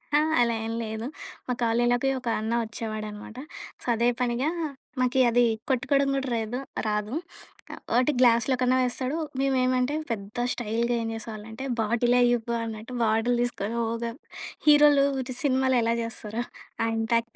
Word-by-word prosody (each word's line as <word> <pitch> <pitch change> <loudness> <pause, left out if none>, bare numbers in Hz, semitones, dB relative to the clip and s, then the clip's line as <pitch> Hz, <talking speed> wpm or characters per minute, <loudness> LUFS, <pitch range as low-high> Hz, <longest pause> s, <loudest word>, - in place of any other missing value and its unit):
ఆ! - - +6 0.2
అలా 235 -1 +3
ఏం 225 - -3
లేదు. 220 +1 -4 0.4
మా 250 - 0
కాలేజ్‌లోకి 240 +3 +2
ఒక 250 - -10
అన్న 220 +1 -2
వచ్చేవాడనమాట. 215 0 -6 0.4
సో - - -12
అదే 235 +2 +3
పనిగా 250 +4 +1 0.5
మాకి 255 +1 +2
అది 245 +1 +4 0.3
కొట్టుకోవడం 275 +2 +2
కూడా 270 -1 -2
రేదు 225 +3 -3 0.3
రాదు. 210 +4 -1 0.8
ఒకటి 255 +4 +4
గ్లాస్లో 240 +1 +4
కన్నా 255 0 +3
వేస్తాడు. 255 +4 -1 0.2
మేమెమంటే 255 0 +2 0.2
పెద్ద 220 +3 -3
స్టైల్‌గా 235 +1 -1
ఏం 225 - -2
జేసేవాళ్ళంటే 225 +3 -7 0.2
బాటిలే 240 +3 +3
ఇవ్వు 235 0 -3
అన్నట్టు 225 +2 -6
బాటిల్ 225 +2 +2
తీసుకొని 235 -2 -2
ఓగా 230 0 -2 0.6
హీరోలు 295 -1 +7 0.2
ఇటు 255 -1 -5
సినిమాలో 260 -2 +3
ఎలా 230 +1 +2
జేస్తారో 230 0 -4 0.4
ఆ - - +1
ఇంపాక్ట్ 230 +1 0
240 Hz, 140 wpm, -26 LUFS, 225-255 Hz, 0.8 s, హీరోలు